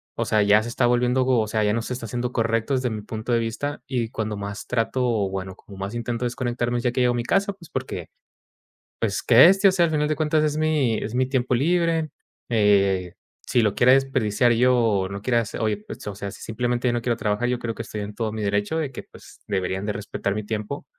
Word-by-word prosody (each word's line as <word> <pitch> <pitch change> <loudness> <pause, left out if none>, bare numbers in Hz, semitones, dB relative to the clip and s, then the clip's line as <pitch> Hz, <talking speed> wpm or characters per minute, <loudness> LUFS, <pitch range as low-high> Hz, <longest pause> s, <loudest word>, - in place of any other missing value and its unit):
o - - -1
sea, 110 - +2
ya 105 +1 +5
se 120 - -6
está 120 +1 +1
volviendo, 125 +1 +2
o 115 -4 +2
sea, 110 0 0
ya 105 - +2
no 115 - 0
se 125 - -4
está 120 -2 -6
haciendo 120 +3 -3
correcto 115 +2 0
desde 125 -1 0
mi 110 -1 -4
punto 110 +3 -5
de 115 - +3
vista 115 +6 -3
y 120 -4 -1
cuando 110 -4 -3
más 100 +1 -6
trato, 125 +2 0 0.3
bueno, 95 -1 -5
como 100 -2 -14
más 100 +4 -5
intento 120 +1 -2
desconectarme 120 0 -1
ya 120 - +1
que 125 - -2
llego 125 -1 +3
a - - -3
mi 120 - -1
casa, 195 - +1
pues, 175 -5 -16
porque 130 - -5 0.9
pues, 105 -3 -1
que 125 +6 +8
este, 195 +2 +5
o - - +3
sea, 175 -2 +3
al - - -2
final 150 -1 +1
de 155 - +1
cuentas 155 0 +1
es 150 0 0
mi 150 -8 +1
es 110 - -5
mi 130 0 +2
tiempo 130 -1 0
libre, 165 +1 +1 0.4
eh, 100 -5 +2 0.3
si 120 - +2
lo 105 -2 +1
quieres 130 +2 +5
desperdiciar 120 -2 +1
yo, 125 +2 +4
o 105 -6 +1
no 100 0 -7
quieras 115 -2 0
oye, 110 -2 0
pues - - -9
o 100 - -4
sea, 100 0 -5
simplemente 120 +4 -2
yo 120 - +1
no 120 -1 -1
quiero 120 -1 0
trabajar, 110 +2 -1
yo 125 -1 0
creo 115 -2 -4
que - - -5
estoy 105 -2 -6
en 105 +1 -7
todo 110 -1 -2
mi 110 -1 -4
derecho 105 +9 0
de 145 -4 -2
que - - -7
pues - - -16
deberían 95 +1 -2
de 105 - 0
respetar 100 0 -3
mi 105 - -3
tiempo 105 +5 -4
120 Hz, 245 wpm, -24 LUFS, 105-130 Hz, 0.9 s, que